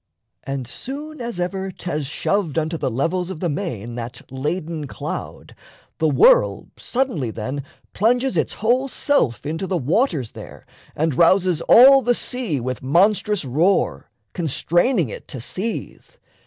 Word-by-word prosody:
And 135 -3 -4
soon 295 - -7
as 235 -6 -5
ever 190 +2 -2
'Thas 165 -6 -4
shoved 170 +1 -1
unto 160 +1 0
the 155 - -1
levels 165 +9 -1
of 185 -4 -6
the 175 - -1
main 125 - -4
That 120 0 -6
laden 155 +3 -3
cloud, - - -6 0.5
the 160 - +3
whirl - - +4
suddenly 240 - -2
then 130 +6 -4 0.3
Plunges 245 +2 +1
its 155 - 0
whole 245 +5 +1
self 260 - 0
into 160 +5 -3
the 185 - 0
waters 155 - 0
there - - -11 0.3
And 160 0 0
rouses 175 +2 +3
all 270 +3 +9
the 245 0 +2
sea 235 - -1
with 125 +1 -4
monstrous 195 +6 +2
roar, 165 +9 +1 0.2
Constraining 175 - +1
it - - -9
to 130 - -7
seethe. 190 - -5
175 Hz, 140 wpm, -21 LUFS, 140-220 Hz, 0.5 s, all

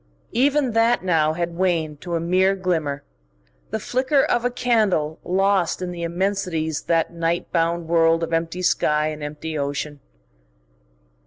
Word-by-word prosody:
Even 275 +1 +2
that 230 0 +2
now 160 -4 +2
had 170 +1 -3
waned 165 -5 0
to 175 -1 -3
a - - 0
mere 185 +3 +2
glimmer, 160 -7 -2 0.7
the 220 - -2
flicker 260 +5 +1
of 240 - +1
a 245 - +2
candle 220 -11 +1
lost 195 -1 +1
in 180 -1 -4
the 175 -1 -7
immensities 170 -3 -1
of - - -28
that 165 0 +1
night 170 0 -2
bound 170 0 0
world 165 0 +3
of 165 - -3
empty 165 +2 -1
sky 150 -3 +2
and 155 -1 -7
empty 150 +2 -5
ocean. 145 +1 -3
170 Hz, 155 wpm, -22 LUFS, 160-195 Hz, 0.7 s, world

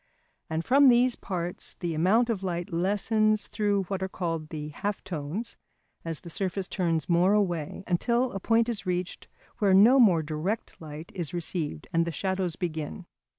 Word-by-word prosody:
And 160 +1 -2
from 275 +2 +6
these 245 0 +5
parts 175 -2 -5
the 175 -3 -2
amount 210 +9 +3
of 205 -4 -3
light 175 0 -3
lessens 210 +4 +1
through 205 -2 0
what 190 +1 -4
are 190 - -2
called 165 -4 -3
the 150 -2 -5
half 200 +7 -4
tones 175 +7 -5 0.5
as 165 -2 -4
the 170 - -10
surface 195 -1 -2
turns 165 -4 -1
more 175 +3 +4
away, 180 -4 -1
until 235 +8 +1
a 195 - -4
point 225 +3 +2
is 235 -4 -2
reached 180 0 -3 0.3
where 200 -4 +4
no 235 +8 +7
more 180 -9 +5
direct 160 +9 -4
light 155 +1 -9
is 175 -2 -4
received, 160 - -3
and 165 0 +3
the - - -1
shadows 185 0 -2
begin. 160 - -4
185 Hz, 170 wpm, -27 LUFS, 165-210 Hz, 0.5 s, no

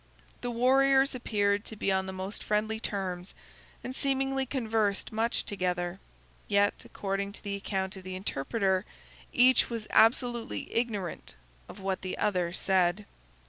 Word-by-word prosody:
The 245 - -2
warriors 270 +3 +4
appeared 205 -4 +1
to 220 - -6
be 200 - 0
on 190 0 +1
the - - -3
most 190 +2 -4
friendly 215 +1 0
terms, 190 -4 -4 0.5
and 255 - -5
seemingly 270 -1 0
conversed 220 -6 0
much 225 +1 +1
together; 180 -2 -2 0.5
yet, 205 0 +2
according 200 0 -3
to - - -10
the 200 -1 -2
account 190 -1 -3
of 190 - -10
the 185 0 -6
interpreter, 190 +2 0 0.5
each 255 0 +5
was 230 -3 -4
absolutely 235 +1 +2
ignorant 210 - -2 0.3
of 200 - -10
what 190 -1 -2
the 185 - -4
other 180 -4 +1
said. 185 +1 +1
205 Hz, 140 wpm, -29 LUFS, 190-235 Hz, 0.5 s, each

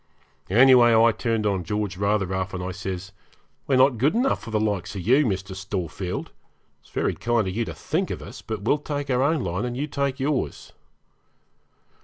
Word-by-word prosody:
Anyway, 120 +2 +6
I 115 +1 +6
turned 115 -1 -1
on 95 -3 0
George 105 +1 -2
rather 100 +1 +1
rough, 95 0 -3
and 90 - -4
I 90 - -3
says, 95 0 -5 0.6
'We're 135 - +3
not 130 -3 +4
good 145 - +2
enough 255 +3 +1
for - - -9
the 110 -1 0
likes 105 -3 -2
of 95 - -4
you, 130 - +4
Mr. 95 -1 -3
Storefield. 95 -1 -4 0.5
It's - - -24
very - - -1
kind 115 -3 0
of 95 - -4
you 115 0 0
to - - -7
think 180 +6 -2
of - - -4
us, - - -10
but 110 -3 -5
we'll 145 +7 +2
take 145 -2 -4
our 125 0 +2
own 145 0 +2
line 90 +3 -2
and 125 0 -3
you 145 - -1
take 140 -2 -2
yours.' 140 0 -2
110 Hz, 200 wpm, -24 LUFS, 95-130 Hz, 0.6 s, Anyway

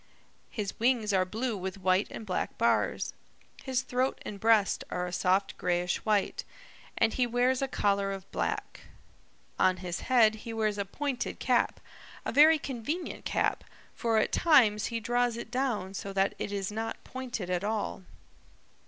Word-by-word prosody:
His 210 -4 -4
wings 230 -3 +2
are 185 -1 +3
blue 225 +5 -2
with 190 0 -5
white 185 +1 +2
and 220 - -7
black 185 - -2
bars. - - +1 0.5
His 260 -1 -1
throat 255 +1 0
and 200 - -6
breast 220 -1 +3
are 180 0 -2
a 180 - -6
soft 190 +3 +1
grayish 175 0 0
white, 210 -3 0 0.5
and 225 -1 +3
he 250 -1 +1
wears 245 +2 +2
a 270 - +1
collar 200 -5 +1
of 195 -1 -6
black. - - -3 0.8
On 185 0 +4
his 175 -1 -4
head 225 -4 +4
he 230 - -6
wears 215 -2 0
a 200 - -1
pointed 275 +5 -3
cap, - - +1 0.5
a - - -1
very 310 +5 +7
convenient 285 +5 -4
cap, - - 0 0.3
for 230 -2 0
at 215 - +2
times 225 -11 +4
he 230 -1 -2
draws 240 +1 0
it 235 - -7
down 240 -7 -1
so 195 0 -5
that 195 0 +2
it - - -3
is 200 -1 -2
not 225 +1 -4
pointed 245 -8 -5
at 180 +1 0
all. 210 -2 -2
215 Hz, 165 wpm, -29 LUFS, 195-245 Hz, 0.8 s, very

